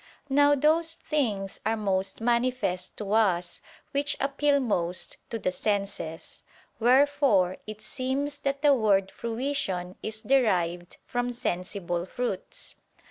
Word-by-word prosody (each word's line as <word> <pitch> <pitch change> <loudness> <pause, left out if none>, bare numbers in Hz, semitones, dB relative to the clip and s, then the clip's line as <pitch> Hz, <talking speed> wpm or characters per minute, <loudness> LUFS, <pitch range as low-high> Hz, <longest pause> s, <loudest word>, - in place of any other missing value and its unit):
Now 285 +1 +5
those 320 +3 +3
things 215 -14 -2
are 225 +1 0
most 195 -1 -1
manifest 235 -6 0
to 205 -1 -3
us 180 -6 +2 0.3
which 285 +1 0
appeal 280 +1 +2
most 180 -8 0
to 230 - -3
the 185 - -1
senses: 200 -5 -3 0.4
wherefore 250 -6 +4
it 215 0 -8
seems 280 +4 -2
that 275 0 -2
the 290 -1 +7
word 200 -6 +2
"fruition" 225 -7 -3
is 220 0 -5
derived 180 -10 +1
from 245 0 -1
sensible 180 -4 -3
fruits. 240 -3 -4
225 Hz, 120 wpm, -27 LUFS, 190-275 Hz, 0.4 s, the